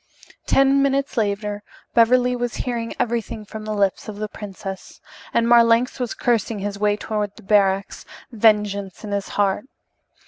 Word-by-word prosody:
Ten 275 0 +4
minutes 275 0 0
later 205 -2 -1 0.3
Beverly 250 +2 +4
was 245 -1 -3
hearing 235 -2 -3
everything 225 -2 -2
from 215 +1 -8
the 215 - -3
lips 200 -2 0
of 210 - -6
the 215 0 -3
princess, 195 -2 -8 0.3
and 230 0 +2
Marlanx 235 +1 +4
was 245 -2 -3
cursing 230 -2 0
his 200 0 -4
way 210 0 +2
toward 210 -2 -3
the 220 - -15
barracks, 195 -1 +1 0.3
vengeance 210 -4 +1
in 210 - -6
his 200 -1 -2
heart. 205 +2 +1
215 Hz, 150 wpm, -22 LUFS, 205-235 Hz, 0.3 s, Ten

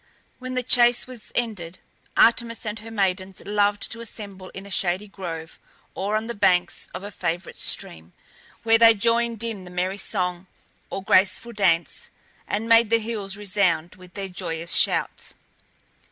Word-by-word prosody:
When 255 0 -5
the 255 - 0
chase 240 0 +4
was 250 -4 -8
ended, 185 -8 -2 0.4
Artemis 230 0 +4
and 210 0 -3
her 225 +2 -9
maidens 190 -3 -1
loved 205 0 +1
to 230 - -4
assemble 200 -4 -8
in 195 - -9
a 200 - -10
shady 190 +2 0
grove, 165 -5 -7 0.3
or 205 +2 -1
on 215 +1 0
the 235 - -4
banks 180 -4 +1
of - - -7
a 205 - -6
favourite 175 -1 -3
stream, 80 +2 -2 0.5
where 225 0 +5
they 230 -1 +8
joined 230 +1 +1
in 220 -5 -4
the 180 - -10
merry 185 +2 -2
song, 180 -2 -2 0.4
or 195 - -5
graceful 200 +5 +3
dance, 180 -5 +1 0.4
and 215 +2 -2
made 230 -1 +6
the 230 - +5
hills 215 -3 -4
resound 185 -5 +1
with 180 -1 -15
their 200 -1 -4
joyous 165 -2 -4
shouts. - - 0
200 Hz, 160 wpm, -24 LUFS, 185-225 Hz, 0.5 s, they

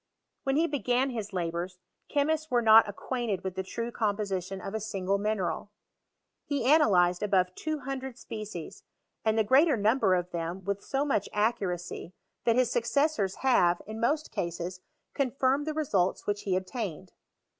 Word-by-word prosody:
When 270 0 +1
he 320 +3 +4
began 265 -3 0
his 220 -4 -4
labours, 175 0 -3 0.3
chemists 310 +2 +1
were 245 -3 +2
not 220 -1 +7
acquainted 220 -2 -3
with 190 -1 -3
the 190 - -2
true 230 +5 -4
com 210 -4 0
position 195 -2 -3
of 195 +2 -6
a 220 - -1
single 200 -2 -1
mineral. 205 -1 -1 0.7
He 280 -5 -2
analyzed 190 - +4
above 190 -3 +2
200 270 -2 -4
species, 215 -9 -7 0.4
and 220 0 +2
the 220 - +4
greater 270 +5 +5
number 215 -2 +3
of 180 0 -2
them 170 +2 -4
with 200 +1 -3
so 275 +1 -1
much 240 -9 0
accuracy, 185 -5 -1 0.3
that 230 - +4
his 250 -1 +2
suceesaora 235 -5 +1
have, 180 -10 +4
in 220 +1 -7
most 295 +7 0
cases, 175 +1 -4 0.3
confirmed 275 +2 +1
the 310 - -1
results 200 - 0
which 205 0 -1
he 190 -2 +1
obtained. 185 - -4
215 Hz, 155 wpm, -29 LUFS, 185-260 Hz, 0.7 s, not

